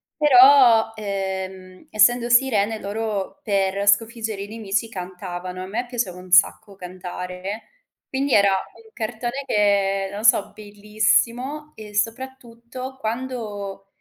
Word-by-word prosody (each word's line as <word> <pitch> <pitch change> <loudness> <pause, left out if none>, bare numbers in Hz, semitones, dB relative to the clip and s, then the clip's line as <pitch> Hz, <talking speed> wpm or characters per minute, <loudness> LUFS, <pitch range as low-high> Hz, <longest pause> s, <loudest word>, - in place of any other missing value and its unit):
però, 255 -5 +6
ehm, 190 -2 -5
essendo 240 +3 +3
sirene 225 -4 +2
loro 210 +4 -4
per 200 -2 0
sconfiggere 220 0 +1
i - - -8
nemici 220 0 -3
cantavano. 180 -2 -7
A - - -6
me 230 +6 -3
piaceva 230 -7 -3
un 180 0 -14
sacco 195 +3 +3
cantare, 180 +2 -7 0.5
quindi 270 +1 -1
era 200 -1 +5
un 220 +4 -5
cartone 240 +4 -4
che, 195 -3 +1
non 205 +2 -6
so, 210 -2 +4
bellissimo 220 +7 -1
e 210 -1 -11
soprattutto 255 +2 -5
quando, 220 -5 -5
215 Hz, 115 wpm, -22 LUFS, 195-240 Hz, 0.5 s, però